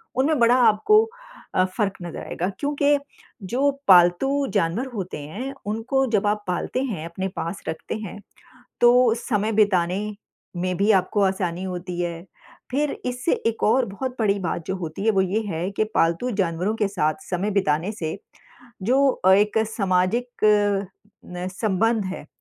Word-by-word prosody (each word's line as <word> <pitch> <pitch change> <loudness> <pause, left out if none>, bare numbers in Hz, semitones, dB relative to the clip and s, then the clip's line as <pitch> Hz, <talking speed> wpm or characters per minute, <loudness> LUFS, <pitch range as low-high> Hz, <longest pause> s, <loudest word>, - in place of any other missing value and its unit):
उनमें 275 +2 +2
बड़ा 235 +1 +5
आपको 420 - +5 0.5
अ, 185 - +4
फ़र्क 195 +1 -1
नज़र 175 -1 -6
आएगा 180 +3 -2
क्योंकि 290 0 +2 0.5
जो 265 +7 +2 0.2
पालतू 190 +11 +5
जानवर 200 +4 0
होते 190 -5 -5
हैं, 205 - -6
उनको 225 +6 0
जब 210 -2 +2
आप 210 0 0
पालते 180 +8 -2
हैं 195 -12 -4
अपने 180 +3 -4
पास 170 +4 -4
रखते 160 - -4
हैं, 210 -2 -7 0.6
तो 240 -1 +5
समय 215 -2 -1
बिताने 190 -3 +2 0.6
में 180 +1 -1
भी 200 +3 +2
आपको 190 +2 +1
आसानी 185 -2 0
होती 180 -1 -5
है। 170 -1 -3 0.5
फिर 290 +3 0 0.2
इससे 250 +5 -1
एक 230 0 -1
और 255 +4 +4
बहुत 250 +6 -5
बड़ी 205 -3 +2
बात 170 -2 -3
जो 190 - -2
होती 170 +1 -5
है 220 - +4
वो 195 - +2
ये 190 +4 0
है 175 +1 -2
कि 215 - +1
पालतू 170 +10 +1
जानवरों 180 +3 0
के 210 -2 +1
साथ 155 -6 0 0.2
समय 190 +3 -1
बिताने 185 -1 +1
से 170 -3 -4 0.6
जो 265 +7 +3
अ, 190 -6 +3
एक 210 +3 +3
सामाजिक 195 +3 0 1.0
न 180 +1 -5
संबंध 215 +3 0
है, 185 -5 -6
200 Hz, 160 wpm, -23 LUFS, 180-235 Hz, 1.0 s, बड़ा